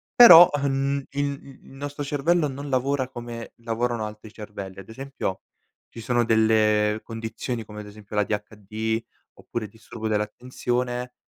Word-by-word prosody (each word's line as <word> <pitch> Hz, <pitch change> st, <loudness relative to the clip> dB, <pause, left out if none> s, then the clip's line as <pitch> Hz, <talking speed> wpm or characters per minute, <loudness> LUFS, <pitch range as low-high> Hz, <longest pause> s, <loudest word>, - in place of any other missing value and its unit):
Però, 175 Hz, -8 st, +11 dB
uhm, 140 Hz, -1 st, 0 dB
il 145 Hz, +1 st, 0 dB
il 140 Hz, -1 st, -11 dB
il -, -, -16 dB
nostro 145 Hz, +2 st, -6 dB
cervello 150 Hz, +3 st, +1 dB
non 140 Hz, +1 st, -6 dB
lavora 130 Hz, 0 st, 0 dB
come 120 Hz, -2 st, -8 dB
lavorano 115 Hz, 0 st, -2 dB
altri 105 Hz, 0 st, -9 dB
cervelli. 100 Hz, -3 st, -8 dB
Ad 95 Hz, -, -12 dB
esempio, 135 Hz, -5 st, -5 dB, 0.5 s
ci 115 Hz, -, -11 dB
sono 120 Hz, +1 st, +1 dB
delle 110 Hz, -1 st, +3 dB
condizioni, 115 Hz, +1 st, -5 dB
come 105 Hz, 0 st, -10 dB
ad 105 Hz, -, -11 dB
esempio 105 Hz, 0 st, -11 dB
l'ADHD 105 Hz, +2 st, -2 dB, 0.3 s
oppure 115 Hz, -2 st, -5 dB
il 100 Hz, -, -12 dB
disturbo 110 Hz, 0 st, -7 dB
dell'attenzione 125 Hz, +3 st, -2 dB
115 Hz, 145 wpm, -25 LUFS, 110-135 Hz, 0.5 s, Però